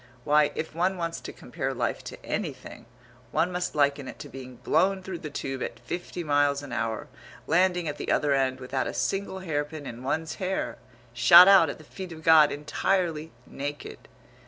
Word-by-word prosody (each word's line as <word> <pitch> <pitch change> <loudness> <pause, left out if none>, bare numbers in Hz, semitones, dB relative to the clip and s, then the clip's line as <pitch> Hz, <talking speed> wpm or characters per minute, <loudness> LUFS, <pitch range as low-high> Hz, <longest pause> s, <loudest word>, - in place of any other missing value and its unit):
Why, 150 +1 +3
if 160 - -4
one 180 +3 0
wants 165 -1 -3
to - - -7
compare - - -5
life - - -2
to - - -9
anything, - - -5 0.4
one 175 - +1
must 180 -2 -3
liken 140 -2 +1
it - - -8
to - - -9
being 130 -1 -10
blown 190 +8 +1
through 185 -2 -6
the 155 - -6
Tube 135 -2 -5
at - - -5
fifty 175 0 -5
miles 145 -1 +2
an 140 - -9
hour 115 -2 -2 0.4
landing 180 +1 +2
at 150 -1 -4
the - - -3
other 145 -1 +2
end 130 -1 +1
without 130 +1 -2
a - - -5
single 195 -1 -2
hairpin 150 -3 -3
in 120 -2 -8
one's 160 +5 -2
hair! 190 +1 -2 0.3
Shot 150 +10 +9
out 190 -6 +7
at - - -5
the 155 - -14
feet 185 +4 -9
of 160 -1 -10
God 155 -2 +7
entirely 160 +1 -1
naked! 145 +1 -7
155 Hz, 185 wpm, -27 LUFS, 140-175 Hz, 0.4 s, Shot